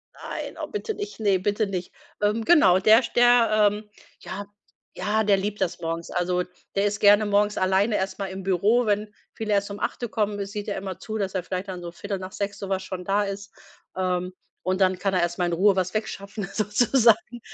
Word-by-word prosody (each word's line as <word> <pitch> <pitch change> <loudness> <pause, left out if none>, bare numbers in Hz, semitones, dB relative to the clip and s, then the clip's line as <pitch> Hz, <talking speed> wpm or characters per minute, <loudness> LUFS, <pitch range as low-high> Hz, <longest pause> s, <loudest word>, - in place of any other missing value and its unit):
Nein, - - -6
oh, - - -3
bitte 430 +1 -4
nicht, 415 - -7
ne, 200 -3 +2
bitte 205 +2 0
nicht. 185 -2 -4 0.3
Ähm, 210 +2 +1
genau, 190 - +6
der 220 +5 +6
st - - -7
der, 230 -3 +5
ähm, 210 0 -8 0.3
ja, 200 +2 -6 0.5
ja, 210 +4 0
der 200 -1 +4
liebt 205 +1 -3
das 180 -1 -1
morgens. 165 0 -4
Also, 180 0 0 0.3
der 200 +1 +2
ist 205 0 -1
gerne 205 +1 +6
morgens 205 0 +2
alleine 190 +3 +2
erst 190 0 -3
mal 200 - -3
im 190 +1 -6
Büro, 205 +6 +2
wenn 210 0 0 0.2
viele 215 -2 -2
erst 200 0 +1
um 200 - -7
8 240 -3 -3
kommen, 205 -2 -1
sieht 205 0 -6
er 205 - -2
immer 190 -2 -5
zu, 220 0 -5
dass 195 -2 -3
er 180 - -1
vielleicht 185 +2 -4
dann 180 -2 -6
so 170 -1 -7
6:15 200 +1 -5
so 195 - -6
was 190 -1 0
schon 180 -1 -6
da 205 +1 +2
ist, 200 0 -6 0.4
ähm, 180 0 -1 0.3
und 185 +1 -1
dann 185 -1 +3
kann 195 0 0
er 180 - +2
erst 175 0 -1
mal 180 - +1
in 175 - -1
Ruhe 195 +3 +3
was 185 0 0
wegschaffen 205 -1 -4
sozusagen. 230 +2 +2
200 Hz, 210 wpm, -25 LUFS, 185-210 Hz, 0.5 s, genau